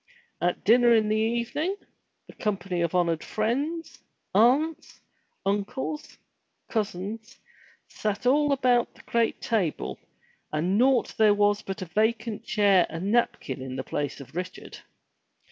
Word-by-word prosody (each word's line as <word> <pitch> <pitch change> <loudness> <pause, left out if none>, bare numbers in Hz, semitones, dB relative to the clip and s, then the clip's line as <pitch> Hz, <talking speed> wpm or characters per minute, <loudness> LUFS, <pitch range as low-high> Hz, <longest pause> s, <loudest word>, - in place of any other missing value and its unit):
At 175 0 0
dinner 240 +2 +6
in 215 -1 +2
the 215 - +2
evening, 235 - 0 0.5
the - - -14
com 210 -2 -1
pany 180 -3 -2
of 170 +1 -1
honored 170 -3 +1
friends, 280 +10 -2 0.3
aunts, 290 - +2 0.5
uncles, 205 +9 -3 0.5
cousins, 220 +3 -4 0.5
sat 210 +2 -3
all 290 +3 +4
about 250 -3 +2
the - - -17
great 230 -1 0
table 200 -9 -1 0.5
and 170 +5 0
naught 255 +2 +3
there 210 -2 +6
was 205 0 +2
but 195 -1 -5
a - - -6
vacant 220 +4 0
chair 200 -5 +3
and 175 +5 -3
napkin 220 - 0
in 130 0 -6
place 145 0 -3
of 140 +3 -12
Richard. 180 +1 -6
215 Hz, 130 wpm, -26 LUFS, 190-240 Hz, 0.5 s, dinner